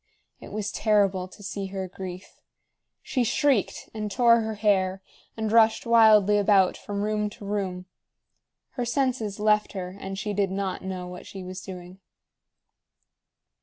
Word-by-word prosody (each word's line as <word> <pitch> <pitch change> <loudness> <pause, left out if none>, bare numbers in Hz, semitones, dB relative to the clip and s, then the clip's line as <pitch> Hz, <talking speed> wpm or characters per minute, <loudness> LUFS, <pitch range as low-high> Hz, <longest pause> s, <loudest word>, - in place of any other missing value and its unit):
It - - -11
was 210 -1 -3
terrible 200 -4 +2
to 205 - -15
see 195 0 -4
her 190 -1 -4
grief. 185 0 -9 0.6
She 255 - 0
shrieked, 255 -2 +1
and 215 -1 -4
tore 235 +2 +4
her 220 0 -3
hair, 195 -2 +1 0.3
and 220 -1 -2
rushed 225 -1 +4
wildly 215 -3 +6
about 200 -2 +4
from 205 -1 -4
room 210 0 0
to 205 - -12
room. 190 -3 -3 0.9
Her 245 - -3
senses 240 -5 -1
left 210 0 +2
her, 185 -1 -5
and 195 0 -6
she 205 +1 -3
did 200 -1 +1
not 190 0 -3
know 185 -1 -5
what 180 0 -9
she 190 -1 -8
was 185 +1 -7
doing. 180 0 -10
205 Hz, 150 wpm, -26 LUFS, 190-215 Hz, 0.9 s, wildly